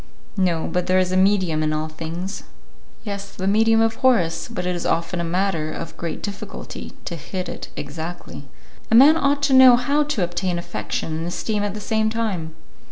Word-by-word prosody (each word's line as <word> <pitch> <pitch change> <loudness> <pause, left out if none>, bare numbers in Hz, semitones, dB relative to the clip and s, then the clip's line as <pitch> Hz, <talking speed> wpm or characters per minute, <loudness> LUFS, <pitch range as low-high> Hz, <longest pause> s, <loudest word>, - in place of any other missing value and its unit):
"No, 175 -4 +1
but 180 0 -2
there 185 0 +3
is 185 -1 +2
a - - +1
medium 185 -4 +2
in 155 0 0
all 155 +1 -1
things." 165 +5 -6 0.6
"Yes, 200 -2 -6
the 190 - -4
medium 225 +3 +4
of 225 0 +1
Horace, 195 -11 +2
but 180 - -4
it 180 0 0
is 175 - -4
often 170 +2 -1
a - - -1
matter 170 -2 -1
of 165 - -6
great 165 -2 -5
difficulty 200 -1 -7
to 170 - -4
hit 185 +3 -5
it - - -7
exactly." 160 +1 -7 0.4
"A 225 - +4
man 280 +6 +8
ought 285 -2 +1
to 275 - +3
know 260 -2 +9
how 280 +5 +1
to 290 -10 -1
obtain 175 +1 -1
affection 160 -2 -4
and 165 +1 -3
esteem 210 +4 -2
at 205 0 -2
the - - -5
same 220 +1 0
time." 195 -8 -3
185 Hz, 195 wpm, -22 LUFS, 170-220 Hz, 0.6 s, know